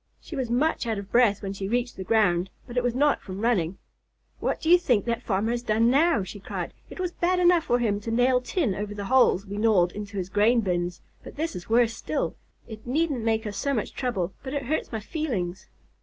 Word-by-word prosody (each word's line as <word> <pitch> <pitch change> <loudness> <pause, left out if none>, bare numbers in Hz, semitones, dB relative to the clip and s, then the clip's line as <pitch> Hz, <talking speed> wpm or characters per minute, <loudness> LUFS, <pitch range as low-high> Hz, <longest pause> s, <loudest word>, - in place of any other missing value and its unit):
She 330 - -9
was 260 -4 -2
much 260 +1 +1
out 220 -2 -1
of 200 0 -7
breath 235 -5 +3
when 195 0 -3
she 195 0 -4
reached 240 +3 -1
the 190 - -6
ground, 185 -4 +2 0.2
but 240 - -10
it 250 - +3
was 245 -1 -1
not 290 +2 +2
from 190 0 -7
running. 195 -7 +1 0.6
"What - - -1
do 320 - -5
you 355 +2 +7
think 245 - +1
that 235 -1 -1
farmer 210 +2 0
has 240 0 -1
done 230 0 +2
now?" 295 - +3
she 190 +3 -8
cried. - - -5 0.2
"It - - -10
was 360 -1 -1
bad 355 +1 +1
enough 350 -2 +4
for 245 - +2
him 215 -4 0
to 210 - -6
nail 250 +2 +3
tin 250 - 0
over 205 +1 -5
the 200 -1 -5
holes 245 -4 +4
we 200 0 -6
gnawed 200 -6 +3
into 205 0 -7
his 185 -1 -3
grain 215 +4 +3
bins, 175 -3 -2 0.2
but - - -10
this 320 +3 -3
is 180 +2 -8
worse 230 0 +3
still. - - -3 0.3
It 220 0 -10
needn't 285 -2 0
make 225 0 0
us 205 -2 -4
so 280 +6 0
much 215 - -3
trouble, 200 -9 -2
but 265 +1 -5
it 280 - -2
hurts 310 +5 -2
my 220 -2 -3
feelings." 205 - -3
230 Hz, 235 wpm, -26 LUFS, 200-255 Hz, 0.6 s, you